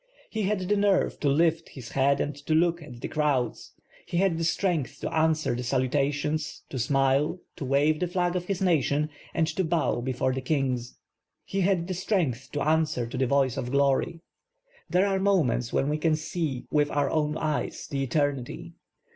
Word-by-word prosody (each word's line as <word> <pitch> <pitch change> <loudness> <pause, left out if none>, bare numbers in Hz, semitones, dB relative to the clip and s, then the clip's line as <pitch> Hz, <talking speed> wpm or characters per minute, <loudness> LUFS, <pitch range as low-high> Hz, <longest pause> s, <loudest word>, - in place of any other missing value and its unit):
He 220 - -2
had 205 -1 0
the 205 - +3
nerve 200 -2 +2
to 145 - +1
lift 165 +3 +2
his 125 -4 -10
head 140 +1 +2
and 145 - -2
to 155 - +3
look 170 +1 +2
at 125 -6 -11
the - - -3
crowds, 145 -6 -1 0.3
he 170 - -4
had 180 -3 +2
the - - -1
strength 160 -5 0
to - - -3
answer 160 -3 +2
the 120 - -3
salutations, 140 +4 -1
to 130 - -4
smile, 135 +6 +2 0.2
to 145 - -5
wave 145 +4 +2
the 180 - 0
flag 175 0 0
of 180 -1 -2
his 195 0 -2
nation, 150 -3 +2 0.2
and 165 - +3
to 160 +4 -1
1)ow 160 -7 0
before 130 0 0
the 130 - -3
kings. 130 -3 -1 0.5
He 195 - -2
had 180 -2 +2
the 185 - -2
strength 170 - -1
to 145 - -1
answer 155 -6 +1
to 115 - -7
the 130 0 +1
voice 135 -1 +2
of 125 - -3
glory. 140 +5 +1 0.7
There 185 +2 +3
are 195 -1 +1
moments 165 - +2
when 135 - +1
we 150 +1 0
can 160 0 +2
see 155 -4 -3
with 145 -1 +2
our 145 -2 0
own 150 0 0
eyes 155 -2 -2
the 140 -1 -2
eternity. 135 -1 -2
150 Hz, 190 wpm, -27 LUFS, 135-170 Hz, 0.7 s, the